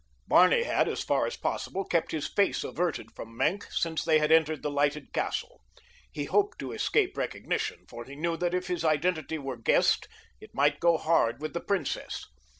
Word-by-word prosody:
Barney 185 - +5
had, - - +1
as - - -3
far - - +1
as 475 - -5
possible, 195 0 -3
kept 170 -2 0
his 155 -2 -2
face 200 - +1
averted 170 -10 -2
from 115 0 -10
Maenck 200 +10 0
since 165 -1 -1
they 160 -1 +4
had 150 0 +1
entered 160 -1 +3
the 150 - -1
lighted 145 +1 0
castle. - - -3 0.5
He - - -4
hoped 410 +1 +1
to - - -5
escape 400 -3 +1
recognition, - - -3
for 120 0 -9
he 135 +2 -10
knew 165 +3 -1
that 175 +1 0
if 180 0 -1
his 180 -2 -2
identity 160 0 0
were 135 -4 -5
guessed 115 - +2 0.3
it - - -15
might 145 +1 +2
go 170 -1 +4
hard 145 -8 +2
with 155 +1 -5
the 170 - -3
princess. 190 -8 -2
160 Hz, 190 wpm, -28 LUFS, 145-180 Hz, 0.5 s, Barney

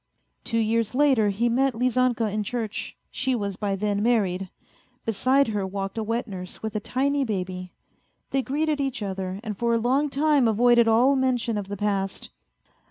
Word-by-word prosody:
Two 230 - -2
years 225 +1 +1
later 265 -7 +4
he 215 +4 0
met 260 +2 +2
Lizanka 250 -1 +1
in 215 - 0
church. 220 0 -4
She 260 0 0
was 200 -4 -3
by 200 0 -1
then 205 +1 -1
married; 195 -5 +1 0.6
beside 260 +4 +2
her 205 -2 -1
walked 195 0 -4
a 225 - -2
wet 230 +2 -2
nurse 185 -2 -8
with 220 -1 -4
a - - +1
tiny 275 +6 0
baby. 185 -5 -4 0.6
They 270 - +2
greeted 295 +2 -1
each 270 -5 -2
other, 190 -1 -4
and 215 -3 -4
for 235 +3 +1
a - - +3
long 265 +6 +1
time 285 -2 +3
avoided 235 +1 +4
all 245 +5 +4
mention 250 -4 0
of 205 -2 -3
the 200 0 -5
past. 195 -1 -2
225 Hz, 175 wpm, -25 LUFS, 200-255 Hz, 0.6 s, later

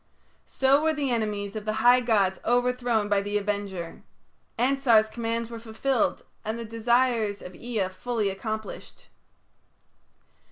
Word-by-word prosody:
So 270 +2 +3
were 320 0 +2
the 280 -3 -1
enemies 210 -3 -2
of 215 -1 -5
the 215 - -1
high 245 +1 +8
gods 200 -6 +2
overthrown 245 -2 +1
by 205 -1 +2
the 205 +1 -1
Avenger. 200 -4 -4 0.6
Ansar's 245 -3 +4
commands 230 0 -3
were 230 - -6
fulfilled 230 +2 -1 0.2
and 220 +2 -3
the 230 - -5
desires 230 -2 +1
of 180 - -10
Ea 220 -2 -2
fully 210 +2 -2
accomplished. 215 +3 -6
225 Hz, 130 wpm, -26 LUFS, 205-245 Hz, 0.6 s, high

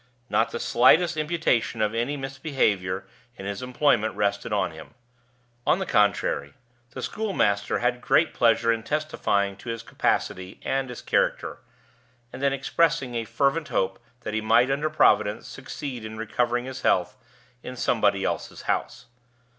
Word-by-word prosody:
Not - - +2
the - - -5
slightest 160 +7 +4
imputation 155 -7 0
of 105 0 +1
any 120 +6 -1
misbehavior 130 - -1 0.3
in 95 - -8
his 100 -1 -4
employment 125 -3 +1
rested 100 -1 -1
on - - +1
him. - - -12 0.7
On - - +4
the 190 - -3
contrary, 90 - +1 0.4
the - - -5
schoolmaster 175 - 0
had 120 0 0
great 160 +5 +3
pleasure 115 0 +3
in 115 - -3
testifying 110 -8 -1
to 115 - -9
his 115 0 -4
capacity 95 -4 -1
and 135 -1 -1
his 125 - -8
character, - - 0 0.7
and - - -7
in 140 0 +3
expressing 140 0 +1
a 115 -1 -2
fervent 140 +7 0
hope 95 - -1 0.2
that 110 - -5
he 110 - 0
might 120 +4 +4
(under 145 +3 0
Providence) 105 -4 +3
succeed 130 0 -7
in 110 0 -7
recovering 120 +3 -1
his 130 0 -7
health - - +2 0.5
in 125 - -7
somebody 105 -5 +1
else's - - -4
house. - - -2
120 Hz, 150 wpm, -25 LUFS, 105-140 Hz, 0.7 s, slightest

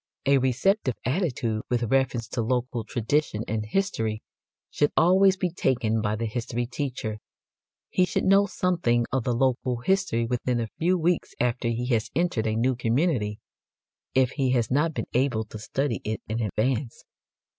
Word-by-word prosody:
A 140 0 +5
receptive 130 - +1
attitude 125 - -1
with 120 -1 +1
reference 125 -1 +1
to 120 - -2
local 125 0 -1
tradition 115 0 -1
and 110 0 -1
history 110 - -1 0.5
should 145 - +1
always 190 +3 +5
be 180 -2 -1
taken 120 -8 0
by 105 0 0
the 115 +2 -3
history 120 +1 -2
teacher. 120 -5 -4 0.7
He 185 - +3
should - - -1
know 200 +1 +5
something 160 -13 +1
of 130 -3 0
the 125 - +1
local 125 0 +1
history 180 -9 +1
within 125 0 -1
a 115 -2 -3
few 180 +3 +2
weeks 175 +1 0
after 125 0 0
he 115 +1 -1
has 115 -4 +1
entered 165 -10 +1
a 110 - 0
new 125 +3 +1
community, 115 -3 0 0.7
if 130 -1 +4
he 135 -2 0
has 120 -2 +1
not 150 +3 +1
been - - -2
able 125 -3 +1
to 110 0 -10
study 135 +3 -2
it 110 0 -3
in 110 +2 -2
advance. 115 +4 -1
125 Hz, 165 wpm, -26 LUFS, 115-145 Hz, 0.7 s, A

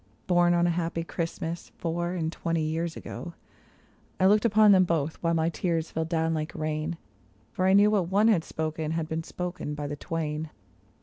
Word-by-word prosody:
Born 175 -1 +4
on 170 0 +3
a 175 - +3
happy 165 -1 -2
Christmas, 165 0 -4
four 175 +1 -2
and 160 -2 -1
twenty 165 -1 -1
years 160 +1 -2
ago; 170 -1 -7 0.8
I 185 - +4
looked 210 +3 +5
upon 215 -1 +6
them 190 -2 +6
both, 160 -3 -1
while 170 -1 +1
my 160 0 +2
tears 165 -2 -1
fell 160 - -1
down 165 0 0
like 155 0 -3
rain. 155 +2 -2 0.5
For 185 +8 0
I 190 - +5
knew 205 +1 +6
what 190 -5 +1
one 205 +3 +4
had 200 -8 +4
spoken, 155 0 -3
had 165 -1 -2
been 160 0 -2
spoken 175 -3 -5
by 145 0 -4
the 145 0 -3
twain. 155 0 -3
165 Hz, 190 wpm, -27 LUFS, 160-175 Hz, 0.8 s, upon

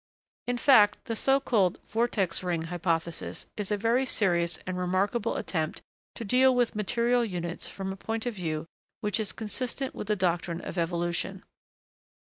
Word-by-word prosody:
In 245 0 0
fact, 215 -6 +5
the 230 - -2
so 270 +4 +3
called 205 -9 +2
'vortex 215 -6 0
ring' 175 -3 -1
hypothesis 170 -1 -2
is 210 -2 -3
a 210 - +1
very 230 +5 +2
serious 175 -9 +1
and 185 - -3
remarkable 190 +6 0
attempt 160 -3 -2 0.3
to 230 - -5
deal 255 +4 +5
with 245 -1 +2
material 235 +4 +2
units 175 -5 -3
from 190 -1 -4
a - - -10
point 225 +3 -3
of 245 - -1
view 160 -6 -3 0.4
which 210 -1 0
is 215 -2 -1
consistent 250 +4 -4
with - - -6
the 210 - +2
doctrine 175 -2 0
of 175 - -4
evolution. 175 +2 -1
200 Hz, 160 wpm, -28 LUFS, 175-235 Hz, 0.4 s, fact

